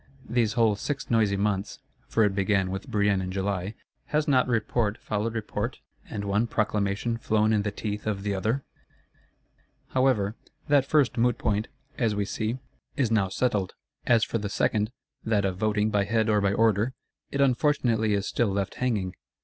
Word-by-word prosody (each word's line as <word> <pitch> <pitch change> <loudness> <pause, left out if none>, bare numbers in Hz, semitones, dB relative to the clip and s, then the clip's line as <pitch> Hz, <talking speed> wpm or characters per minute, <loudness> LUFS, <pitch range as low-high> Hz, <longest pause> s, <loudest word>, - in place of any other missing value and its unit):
These 115 -3 +1
whole 115 -3 +3
six 140 +7 -4
noisy 105 -4 +3
months 100 -1 -1 0.3
(for 115 - +2
it 105 -2 +2
began 95 -1 +1
with 95 +7 -5
Brienne 100 -4 +2
in 90 0 -4
July,) 95 +1 -2 0.3
has 150 0 0
not 130 -3 +4
Report 115 -2 0
followed 110 +2 -2
Report, 110 -2 -3 0.3
and 100 - -4
one 105 +4 +1
Proclamation 110 +1 0
flown 110 0 +2
in 105 - +3
the 105 - -1
teeth 105 +1 -4
of 100 -2 -2
the 100 -1 -1
other? 110 +8 -1 1.3
However, 125 -6 +2 0.3
that 140 -2 +4
first 145 -6 +2
moot 120 0 +3
point, 105 +1 0 0.3
as 115 -3 +1
we 100 0 0
see, 110 +4 -2 0.4
is 125 -5 +1
now 105 -4 +2
settled. 100 -3 0 0.3
As 115 -2 +5
for 115 - -1
the 105 -1 -3
second, 105 +2 +1 0.3
that 105 -3 +1
of 95 -1 -1
voting 105 +1 +1
by 100 -1 +2
Head 110 +1 +1
or 105 -1 +3
by 100 0 +2
Order, 110 +3 +2 0.3
it 140 - -3
unfortunately 125 -5 +2
is 100 0 -1
still 120 -3 +1
left 100 0 -1
hanging. 105 -8 0
105 Hz, 175 wpm, -27 LUFS, 100-115 Hz, 1.3 s, As